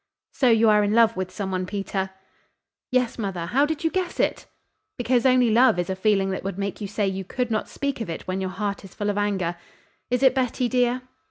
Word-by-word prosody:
"So 255 - +3
you 225 0 +5
are 210 0 +4
in 205 +1 +1
love 230 -1 +5
with 185 -1 -3
some 190 0 -4
one, 185 0 -2
Peter?" 195 -1 -3 0.8
"Yes, 250 -2 0
mother. 190 -5 -3
How 270 +11 +2
did 315 +1 -3
you 325 - +1
guess 370 -2 -2
it?" - - 0 0.5
"Because 245 0 +2
only 250 -2 +4
love 240 -3 +5
is 175 +1 -1
a - - -1
feeling 195 0 +2
that 190 - -4
would 195 -1 -4
make 200 +1 -4
you 205 - -3
say 205 0 -1
you 190 0 -3
could 245 +5 -3
not 215 - -1
speak 280 -4 -3
of 225 - -4
it 165 - -5
when 185 +1 -2
your 190 - -2
heart 200 +1 -3
is 195 - -13
full 205 0 -1
of 205 - -5
anger. 190 -4 -1 0.5
Is 250 +1 0
it 265 - +6
Betty, 255 -1 0
dear?" 250 0 +1
210 Hz, 235 wpm, -24 LUFS, 190-250 Hz, 0.8 s, it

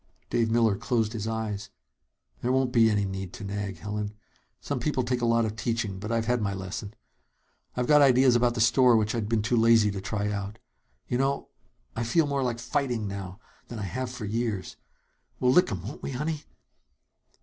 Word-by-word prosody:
Dave 115 -1 +2
Miller 115 -2 +3
closed 115 0 0
his 110 -2 -3
eyes. 110 -2 -3 0.7
"There 125 - 0
won't 130 -1 +2
be 115 -3 +5
any 105 -2 +1
need 95 -1 -5
to - - -8
nag, 100 -2 -4
Helen. 105 +2 -4 0.4
Some 140 -3 -3
people 130 +1 0
take 125 0 -1
a 120 - +2
lot 115 0 +3
of 110 0 -3
teaching, 110 -4 -2
but 105 +3 -5
I've 115 -1 +1
had 125 0 +1
my 100 -1 -1
lesson. 95 +3 -6 0.8
I've 125 - +1
got 150 +2 +6
ideas 130 -2 +5
about 120 0 +2
the 115 - 0
store 120 +1 +5
which 110 0 0
I'd 110 -3 -2
been 115 -2 +1
too 115 +3 +1
lazy 115 -2 +5
to 100 -1 -5
try 105 0 -2
out. 100 +1 -4 0.5
You 125 - -1
know, 135 +1 0 0.5
I 115 - -1
feel 150 +8 +2
more 140 -1 -1
like 125 -3 -1
fighting 125 -1 -1
right 105 - -3
now 95 0 -7 0.3
than 120 - -7
I 105 - -4
have 125 +7 -3
for 125 -3 -6
years! 110 -2 -2 0.6
We'll 125 -1 +3
lick 180 +1 +4
'em, 95 -4 -4
won't 110 +9 -7
we, 135 - -4
honey?" 150 +3 -3
115 Hz, 205 wpm, -27 LUFS, 105-125 Hz, 0.8 s, got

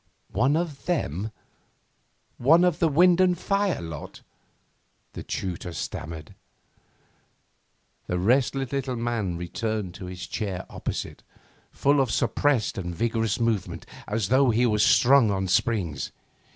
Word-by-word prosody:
'One 130 +9 +2
of 165 -4 -4
them? 110 - -1 1.1
One 160 +8 +5
of 180 -3 +2
the 165 - +4
wind 175 +4 +5
and 180 -1 +3
fire 200 +1 0
lot?' 80 -2 -8 0.9
the - - -6
tutor 90 -2 -4
stammered. 80 -1 -6 1.7
The 90 - -1
restless 130 +6 +1
little 135 -2 -2
man 115 -7 -2
returned 100 +2 -3
to 90 0 -8
his 90 0 -7
chair 100 -5 -4
opposite, - - -5 0.5
full 140 0 +2
of 130 - 0
suppressed 120 +1 +1
and 90 -2 -5
vigorous 115 0 0
movement, 115 -5 -1 0.2
as 105 -2 -1
though 130 +1 +4
he 120 +2 +3
were 105 -3 +1
strung 125 +2 +5
on 95 -1 -1
springs. 90 - 0
115 Hz, 125 wpm, -26 LUFS, 95-140 Hz, 1.7 s, One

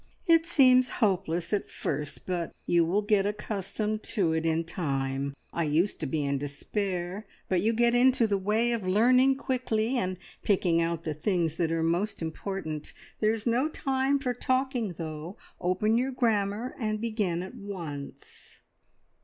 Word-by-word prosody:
"It 330 -2 +4
seems 255 -5 +5
hopeless 180 -5 0
at 205 - -1
first, 150 0 -4
but 175 -3 -3
you 170 -1 +4
will 190 +6 +1
get 205 -1 +3
accustomed 210 +1 -3 0.2
to 170 -6 +3
it 160 0 0
in 165 +1 +1
time. 140 -4 -2 0.2
I 170 - 0
used 160 +7 +1
to - - -2
be 145 +1 -1
in 140 0 0
despair, 180 +7 -3 0.2
but 185 -2 +1
you 220 +4 +2
get 235 +1 +3
into 245 -1 +4
the 200 -2 +1
way 215 +5 +1
of 235 -2 0
learning 250 +7 +5
quickly, 250 -2 0
and 185 -2 -2 0.2
picking 180 -4 +2
out 165 -1 -1
the 155 - -2
things 165 0 0
that 165 -3 +1
are 165 0 0
most 175 +6 0
important. 160 -1 -4 0.3
There's 215 0 +1
no 250 +5 +2
time 270 -1 +1
for 260 -3 -1
talking, 255 -4 0
though. 160 +4 -6 0.2
Open 210 +6 +2
your 260 +2 0
grammar 225 -1 0
and 215 -2 -1
begin 210 -6 -1
at 185 - -8
once." 170 -9 -8
200 Hz, 160 wpm, -28 LUFS, 165-230 Hz, 0.3 s, seems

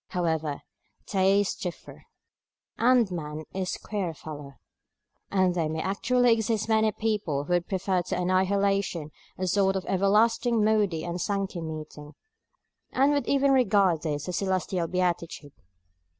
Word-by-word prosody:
However, 160 -4 -2 0.4
tastes 195 0 +1
differ, 180 -2 -7 0.7
and 240 -4 +3
man 155 -2 -5
is 185 -1 -2
a - - -14
queer 190 -6 -2
fellow; 145 -3 -9 0.7
and 185 -2 +2
there 165 -3 -1
may 160 0 -3
actually 245 +5 +2
exist 220 -1 -1
many 220 -1 +3
people 205 -10 -1
who 175 - -2
would 175 0 +1
prefer 190 -1 0
to 175 0 -3
annihilation 185 -3 +1 0.3
a 185 - -2
sort 195 +1 +2
of 190 - -3
everlasting 220 +4 +2
Moody 205 -7 +1
and 175 0 -4
Sankey 195 -3 -2
meeting, 155 -2 -8 0.8
and 275 +3 +3
would 285 -1 0
even 280 0 +3
regard 200 - +3
this 150 -1 -3
as 180 - -2
celestial 185 -2 -1
beatitude. 170 -4 -2
185 Hz, 135 wpm, -27 LUFS, 165-210 Hz, 0.8 s, and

